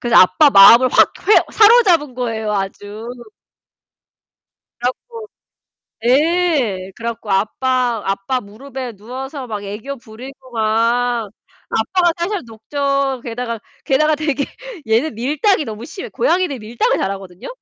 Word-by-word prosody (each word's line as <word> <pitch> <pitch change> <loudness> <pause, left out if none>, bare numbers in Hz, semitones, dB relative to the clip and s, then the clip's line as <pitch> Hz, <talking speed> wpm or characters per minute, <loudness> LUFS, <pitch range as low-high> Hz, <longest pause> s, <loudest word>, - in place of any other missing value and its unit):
그래서 240 -1 -1
아빠 290 - +5
마음을 235 +4 +8
확 - - +4 0.2
휘어 425 - +6
사로잡은 390 - +5
거예요, 225 -4 -3
아주. 205 +2 -5 1.7
그래 245 +1 +1
갖고 455 - -12 0.8
네 270 - +1
그래갖고 230 -2 -6
아빠 240 +4 0
아빠 195 +6 -2
무릎에 250 +4 -8
누워서 255 +6 -8
막 210 -3 -5
애교 215 +8 -6
부리고 255 +4 -13
막 230 +1 0 0.4
아빠가 350 +9 +1
살살 370 +3 -2
녹죠. 275 +3 -2
게다가 235 -1 -4 0.3
게다가 305 +3 +2
되게 295 -2 -1 0.4
얘는 230 +6 +1
밀당이 295 - +1
너무 220 -2 -7
심해. 355 +5 -8
고양이들이 365 - 0
밀당을 225 +2 -1
잘하거든요. 195 -2 -5
245 Hz, 285 characters per minute, -18 LUFS, 220-290 Hz, 1.7 s, 마음을